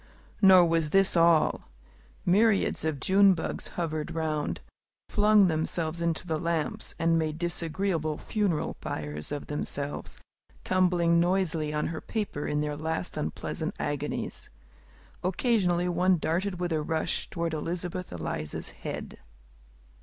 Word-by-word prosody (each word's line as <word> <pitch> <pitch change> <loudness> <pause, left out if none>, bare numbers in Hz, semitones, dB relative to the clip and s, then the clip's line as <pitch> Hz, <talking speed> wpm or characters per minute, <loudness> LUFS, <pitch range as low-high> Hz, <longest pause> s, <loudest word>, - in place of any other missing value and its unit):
Nor 190 -3 +8
was 165 -2 +1
this 195 +3 +4
all. 165 - +3 0.6
Myriads 205 0 +3
of 155 -3 -1
June 195 +5 +5
bugs 160 - -4
and - - -1
millers - - -4
hovered 155 -3 -3
round, 155 -2 -1 0.5
flung 210 -1 +5
themselves 160 0 -1
into 170 0 -1
the 160 -3 -1
lamps, 165 -2 -2
and 165 0 +2
made 155 -1 -2
disagreeable 170 -2 -1
funeral 200 -8 -1
pyres 75 - -5
of 145 -1 -4
themselves, 145 -1 -4 0.5
tumbling 175 -2 +3
noisily 170 -4 +1
on 150 0 -1
her 165 - -5
paper 205 -10 -3
in 150 0 0
their 150 0 -2
last 160 +4 -3
unpleasant 75 - -3
agonies. 145 0 -3 0.7
Occasionally 180 -2 +1
one 180 +1 +3
darted 180 +4 -1
with 175 -2 -1
a 155 - +1
rush 160 +2 -1
toward 170 -1 -2
Elizabeth 175 +3 -4
Eliza's 75 -3 -4
head. - - -7
165 Hz, 130 wpm, -28 LUFS, 155-180 Hz, 0.7 s, Nor